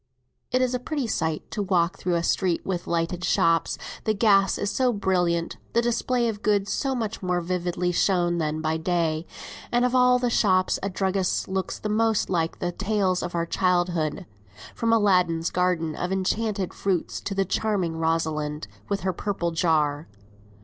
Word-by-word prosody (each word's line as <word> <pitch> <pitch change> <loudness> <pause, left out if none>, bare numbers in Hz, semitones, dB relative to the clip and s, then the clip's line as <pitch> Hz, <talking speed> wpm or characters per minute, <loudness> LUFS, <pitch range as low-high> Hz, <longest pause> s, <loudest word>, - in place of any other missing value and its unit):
It 255 0 +3
is 255 0 0
a 250 - 0
pretty 285 +1 -3
sight 160 -8 -1
to 210 - -2
walk 185 -1 +1
through 180 -1 0
a 170 - 0
street 180 -1 0
with 180 -2 -3
lighted 170 +1 -1
shops; 165 -2 +2 0.3
the 215 - +1
gas 200 -2 +4
is 205 - -1
so 255 -1 +2
brilliant, 180 -5 0 0.2
the 235 - +3
display 240 +1 +1
of 210 -2 -3
goods 205 -1 +1
so 270 -2 -1
much 225 -3 -3
more 180 -1 0
vividly 180 0 -1
shown 175 -1 +1
than 155 0 -1
by 160 0 0
day, 165 -1 -1 0.4
and 245 +1 +3
of 250 - 0
all 250 0 +5
shops 185 -5 +2
a 195 - -2
druggist's 190 -1 0
looks 190 0 -2
the - - -4
most 220 -1 +1
like 165 -2 0
the 175 - -2
tales 195 -1 0
of 175 0 -4
our 170 0 0
childhood, 175 -2 0 0.5
from 230 -1 0
Aladdin's 180 -6 +3
garden 175 -3 0
of 180 - -3
enchanted 195 +1 -1
fruits 185 -4 -2
to 195 - -4
the 195 0 +1
charming 190 -4 -1
Rosamond 160 -2 -1 0.2
with 200 -1 -1
her 185 -1 -1
purple 175 -2 -2
jar. 155 -2 +1
185 Hz, 170 wpm, -25 LUFS, 170-205 Hz, 0.5 s, all